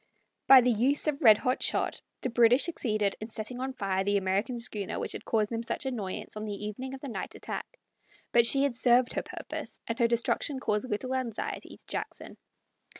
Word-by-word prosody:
By 265 -1 +10
the 245 0 +3
use 255 +6 +2
of 300 -1 -1
red 220 -6 +8
hot 255 +3 -1
shot - - 0 0.2
the 255 - -2
British 240 +3 +5
succeeded 215 - -1
in 215 - -6
setting 225 +3 -4
on 265 +1 -3
fire 195 -5 -1
the 205 +1 +2
American 200 +6 -1
schooner 210 -4 -4
which - - -3
had - - -5
caused 215 -1 0
them 230 0 -2
such 235 - -4
annoyance 215 -9 -4
on 215 - -5
the 210 0 -5
evening 260 +6 -5
of 265 - -12
the 280 - -6
night 240 - -6
attack; - - -7 0.5
but 235 -1 +6
she 275 +2 +6
had 280 -3 +1
served 245 0 +3
her - - -1
purpose, - - -7
and 230 +2 -4
her 235 - +4
destruction 240 +4 0
caused 210 0 -1
little 255 +5 -2
anxiety 255 -4 -4
to - - -23
Jackson. - - -6
235 Hz, 205 wpm, -29 LUFS, 210-260 Hz, 0.5 s, By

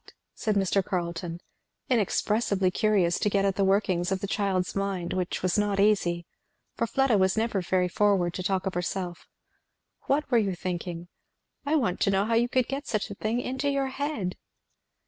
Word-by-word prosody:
said 215 -3 -1
Mr. 195 0 +2
Carleton, 170 -2 -3 0.5
inexpressibly 210 -4 +1
curious 195 -5 +2
to 210 - +1
get 200 -1 +1
at 195 -1 +1
the 200 - +1
workings 190 -2 +1
of 190 - 0
the 200 - -3
child's 195 -2 -1
mind, 195 -3 -2
which 185 -1 -2
was 185 +2 +2
not 205 -1 0
easy, 175 -5 +2 0.5
for 230 - -1
Fleda 270 -4 +2
was 190 +2 +2
never 220 -3 +1
very 180 +1 +1
forward 195 -3 +2
to 185 - -4
talk 190 0 -1
of 190 - -1
herself; 175 0 -3 0.8
"what 285 0 +1
were 240 - +5
you 195 -4 0
thinking? 175 -1 -4 0.6
I 305 - +2
want 225 - +1
to - - +2
know 195 +1 +2
how 230 - 0
you 235 +2 +3
could 255 -1 +1
get 275 +2 -4
such 210 -2 -2
a - - -3
thing 220 +4 -1
into 265 +3 -2
your 275 -1 0
head." 265 -10 -3
195 Hz, 185 wpm, -27 LUFS, 180-220 Hz, 0.8 s, were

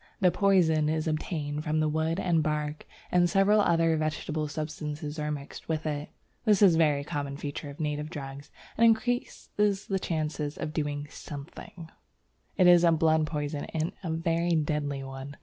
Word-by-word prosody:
The 180 -2 +4
poison 170 -7 +3
is 155 0 -1
obtained 155 -1 -2
from 155 0 0
the 155 - +2
wood 160 +3 0
and 170 -4 +2
bark, 150 0 -2 0.2
and 175 -1 +4
several 195 +3 +4
other 165 -3 +3
vegetable 155 0 -2
substances 150 0 -5
are 150 0 -2
mixed 145 +1 -7
with 160 -1 -1
it. 150 -1 -3 0.3
(This 210 -3 +4
is 190 -4 +7
a - - +2
very 150 -3 +3
common 140 -1 -4
feature 145 0 -5
of 140 - -11
native 150 0 -2
drugs 140 -2 -8 0.3
and - - +5
increases 220 -3 +1
the 195 -1 -1
chances 155 -4 -2
of 150 - -4
doing 145 -2 -2
something.) 160 +3 -9 0.7
It 185 - +5
is 175 -1 +7
a 170 - +6
blood 160 -1 +3
poison, 145 -1 -3
and 160 +1 0
a 170 - -3
very 165 +1 +1
deadly 145 -3 -1
one. 135 +1 -8
155 Hz, 170 wpm, -28 LUFS, 150-170 Hz, 0.7 s, is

